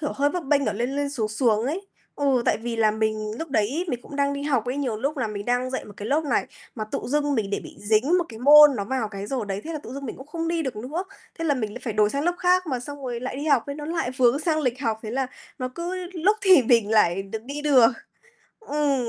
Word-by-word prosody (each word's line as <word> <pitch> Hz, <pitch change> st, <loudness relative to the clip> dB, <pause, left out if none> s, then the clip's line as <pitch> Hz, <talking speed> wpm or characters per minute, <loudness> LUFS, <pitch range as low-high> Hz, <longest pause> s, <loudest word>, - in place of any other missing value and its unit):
kiểu, 295 Hz, -, -2 dB
hơi 285 Hz, +1 st, +2 dB
bấp 350 Hz, -1 st, -3 dB
bênh 280 Hz, 0 st, +2 dB
ở -, -, +1 dB
lên 245 Hz, +6 st, -2 dB
lên, 285 Hz, -1 st, -1 dB
xuống 225 Hz, -6 st, -2 dB
xuống 220 Hz, -1 st, +1 dB
ấy. 365 Hz, +8 st, -3 dB, 0.3 s
Ừ, 270 Hz, -4 st, +2 dB
tại -, -, +2 dB
vì 230 Hz, 0 st, -4 dB
là 220 Hz, -1 st, +4 dB
mình 215 Hz, 0 st, -2 dB
lúc 325 Hz, -, -5 dB
đấy 270 Hz, -, 0 dB
mình 245 Hz, -4 st, -2 dB
cũng 285 Hz, -, -9 dB
đang 280 Hz, 0 st, +1 dB
đi 280 Hz, 0 st, -4 dB
học 265 Hz, -7 st, +1 dB
ấy, 250 Hz, +3 st, -2 dB
nhiều 255 Hz, -6 st, -1 dB
lúc 280 Hz, +7 st, -2 dB
là 250 Hz, -5 st, -1 dB
mình 205 Hz, -1 st, -5 dB
đang 245 Hz, +2 st, 0 dB
dạy 260 Hz, -, -3 dB
một 205 Hz, -, -11 dB
cái 210 Hz, -, -6 dB
lớp 305 Hz, +3 st, +1 dB
này 290 Hz, -, +1 dB, 0.3 s
mà 215 Hz, -3 st, -3 dB
tự -, -, 0 dB
dưng 290 Hz, +1 st, 0 dB
mình 205 Hz, -4 st, -1 dB
để -, -, -1 dB
bị -, -, -12 dB
dính 225 Hz, -, +2 dB
một 350 Hz, -, 0 dB
cái 220 Hz, -, -10 dB
môn 295 Hz, +2 st, +8 dB
nó 200 Hz, -, -2 dB
vào 235 Hz, -1 st, -2 dB
cái 200 Hz, -1 st, -6 dB
giờ 270 Hz, -, -3 dB
đấy, 195 Hz, +1 st, -2 dB
thế 330 Hz, -, -5 dB
là 305 Hz, -, -3 dB
tự 255 Hz, -, -10 dB
dưng 280 Hz, 0 st, -6 dB
mình -, -, -6 dB
cũng 265 Hz, -, -11 dB
không 330 Hz, +2 st, -3 dB
đi 335 Hz, -1 st, 0 dB
được 260 Hz, -7 st, -4 dB
nữa, 295 Hz, -, -4 dB, 0.3 s
thế 330 Hz, -, -3 dB
là 290 Hz, -3 st, +2 dB
mình 215 Hz, -5 st, -3 dB
lại -, -, -7 dB
phải 225 Hz, -, -2 dB
đổi 210 Hz, 0 st, +3 dB
sang 280 Hz, +2 st, -2 dB
lớp 350 Hz, -, +2 dB
khác 365 Hz, 0 st, +3 dB
mà 255 Hz, -5 st, -2 dB
xong 285 Hz, +3 st, -8 dB
rồi 240 Hz, -2 st, -3 dB
lại 255 Hz, +1 st, -4 dB
đi 285 Hz, -, -4 dB
học 280 Hz, -6 st, +3 dB
ấy, 280 Hz, -, -4 dB
nó 295 Hz, -, -6 dB
lại 325 Hz, -6 st, -1 dB
vướng 255 Hz, +1 st, +4 dB
sang 315 Hz, 0 st, 0 dB
lịch 255 Hz, -2 st, -1 dB
học, 225 Hz, -5 st, -1 dB
thế 220 Hz, -, -5 dB
là 265 Hz, +1 st, -1 dB, 0.3 s
nó 255 Hz, -, -2 dB
cứ 345 Hz, +2 st, -4 dB, 0.2 s
lúc 375 Hz, +4 st, +2 dB
thì 375 Hz, -8 st, +7 dB
mình 230 Hz, -3 st, +3 dB
lại 195 Hz, -3 st, +3 dB
được 215 Hz, +3 st, -6 dB
đi 285 Hz, +3 st, -6 dB
được. 260 Hz, -6 st, +6 dB, 0.7 s
Ừm. 290 Hz, -, 0 dB
265 Hz, 290 wpm, -24 LUFS, 225-295 Hz, 0.7 s, môn